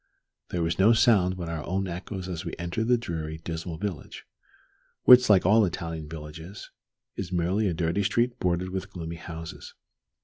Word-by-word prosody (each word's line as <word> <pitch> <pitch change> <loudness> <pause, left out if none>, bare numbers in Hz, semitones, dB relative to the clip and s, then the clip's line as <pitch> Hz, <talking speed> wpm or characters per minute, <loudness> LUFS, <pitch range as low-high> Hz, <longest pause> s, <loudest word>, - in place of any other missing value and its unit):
There 85 -1 -1
was 80 +2 -1
no 110 +5 +6
sound 105 -6 +4
but 85 -2 -5
our 80 -2 -4
own 95 +2 -2
echoes 90 +2 -6
as 90 -3 -4
we - - -5
entered 85 +6 -2
the 125 0 +4
dreary, 80 -8 -5
dismal 80 +1 -5
village, 95 -3 -6 0.8
which, 125 -1 +8
like 95 -4 +5
all 110 +4 +6
Italian 80 -4 -3
villages, 80 +4 -9 0.4
is 95 -2 -5
merely 90 +4 +1
a 90 - 0
dirty 85 +4 0
street 120 +4 +1
bordered 90 0 0
with 95 +1 -4
gloomy 85 -3 -6
houses. 80 -1 -9
90 Hz, 170 wpm, -27 LUFS, 80-100 Hz, 0.8 s, which